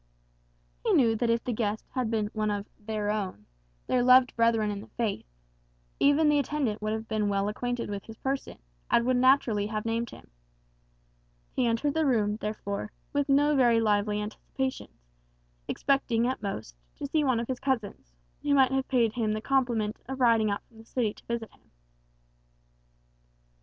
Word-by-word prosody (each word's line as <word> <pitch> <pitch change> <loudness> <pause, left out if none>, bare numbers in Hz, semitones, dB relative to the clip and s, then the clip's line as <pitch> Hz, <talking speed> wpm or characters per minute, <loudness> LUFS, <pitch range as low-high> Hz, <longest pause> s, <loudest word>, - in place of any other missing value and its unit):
He - - +2
knew 230 -4 +4
that 235 +1 0
if 230 0 +1
the 245 - -2
guest 215 -1 -2
had 250 -3 -1
been 215 -2 -1
one 215 -1 0
of 205 -1 -2
"their 210 -1 -2
own," 190 - -4 0.4
their 250 - +2
loved 255 +1 +6
brethren 230 -2 +2
in 200 -1 -5
the - - -12
faith, 220 - -2 0.7
even 290 +2 +4
the 295 -1 +4
attendant 275 -6 -1
would 215 0 -1
have 220 +1 -3
been 215 -2 0
well 200 0 0
acquainted 245 +3 -2
with 200 -1 -5
his 225 -1 -11
person, 270 0 -3 0.3
and 235 - +3
would 255 0 +2
naturally 245 -5 +3
have 215 0 -3
named 230 0 -1
him. - - -14 1.2
He 250 - +2
entered 235 +5 +1
the 320 -1 +1
room, 210 -5 +2
therefore, 210 -1 -4 0.2
with 285 0 0
no 290 +2 +4
very 240 -4 +4
lively 210 -1 +1
anticipations; 225 - -5 0.6
expecting, 240 -4 +1
at 260 - -2
most, 195 - -5 0.2
to - - -6
see 300 +2 +1
one 255 -4 +2
of 230 - -3
his 260 -1 -3
cousins, 225 - -2 0.3
who 285 -1 +2
might 265 -2 +5
have 265 0 0
paid 235 -4 +2
him 220 -3 0
the 215 - -2
compliment 235 -4 0
of 265 0 -4
riding 230 -3 +4
out 200 - -2
from 225 - -20
the - - -12
city 225 -3 -1
to - - -19
visit 235 -2 -3
him. - - -27
230 Hz, 180 wpm, -28 LUFS, 210-260 Hz, 1.2 s, loved